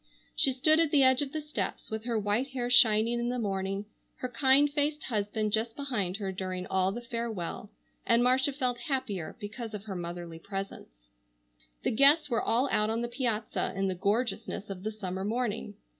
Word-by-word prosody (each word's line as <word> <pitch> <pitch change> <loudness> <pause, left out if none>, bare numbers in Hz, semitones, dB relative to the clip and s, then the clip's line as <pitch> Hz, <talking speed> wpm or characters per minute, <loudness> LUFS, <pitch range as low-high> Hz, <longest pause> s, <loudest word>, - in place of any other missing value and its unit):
She 270 - +5
stood 310 +5 +3
at 330 -2 +3
the 290 -2 +5
edge 260 0 +5
of 280 -2 -3
the 310 - -3
steps, 300 -6 -4
with 220 +1 -4
her 235 -2 0
white 210 +5 0
hair 250 -2 -3
shining 230 -1 +5
in 240 0 -1
the 250 - -1
morning, 195 -2 -2 0.3
her 255 - -4
kind 265 +4 +5
faced 295 +1 -1
husband 210 -1 -1
just 225 +1 0
behind 220 -10 -2
her 195 -3 -3
during 185 -1 -4
all 190 0 +1
the 240 +4 -6
farewell, 230 -6 -4 0.3
and 235 0 +3
Marcia 260 +3 +3
felt 255 -3 -1
happier 225 - -2
because 210 +2 -6
of 200 - -7
her 205 -3 -6
motherly 170 -1 -6
presence. 165 - -8 0.7
The - - +1
guests 280 +5 +5
were 230 - +2
all 245 +5 +2
out 210 0 +2
on 225 +1 -1
the 240 - -1
piazza 235 -4 -1
in 195 0 0
the - - 0
gorgeousness 210 +1 -1
of 185 -2 -6
the 215 +2 -3
summer 190 -3 -4
morning. 215 -1 -2
225 Hz, 190 wpm, -30 LUFS, 195-255 Hz, 0.7 s, She